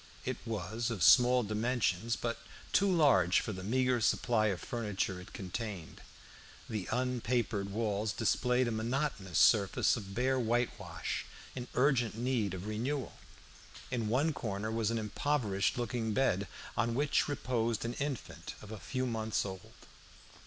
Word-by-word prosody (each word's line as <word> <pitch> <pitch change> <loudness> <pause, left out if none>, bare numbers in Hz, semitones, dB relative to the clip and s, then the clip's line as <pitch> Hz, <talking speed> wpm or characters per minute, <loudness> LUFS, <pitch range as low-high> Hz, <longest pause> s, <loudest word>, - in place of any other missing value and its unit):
It - - -2
was 110 +2 -2
of 105 -8 -2
small 125 - +7
dimensions, 110 -1 0
but 115 0 -3 0.3
too 200 -1 +4
large 135 - +5
for 110 - -4
the 95 -1 -7
meagre 125 +3 +1
supply 110 0 +2
of 95 -4 -1
furniture 105 -5 -2
it 90 - -12
contained. 95 -2 -6 0.7
The 105 -4 -3
unpapered 120 -5 0
walls 105 0 -1
displayed 125 +3 +1
a - - -1
monotonous 110 - -1
surface 100 -4 +4
of 100 -4 -7
bare 130 +2 +2
whitewash 120 0 -1 0.3
in 125 -1 -5
urgent 125 -5 +2
need 115 -6 0
of 95 +1 -7
renewal. 125 +6 -3 0.7
In 115 -3 -1
one 145 +7 +2
corner 110 -3 -3
was 110 -1 0
an 115 - 0
impoverished 105 -3 0
looking 120 -3 -1
bed, 100 -7 +2 0.3
on 115 +1 +1
which 140 +1 +2
reposed 120 -5 -1
an 120 - -2
infant 110 - -5
of 105 - -11
a 110 - -6
few 130 +4 -2
months 110 -3 -1
old. 95 -2 -9
115 Hz, 145 wpm, -33 LUFS, 105-125 Hz, 0.7 s, small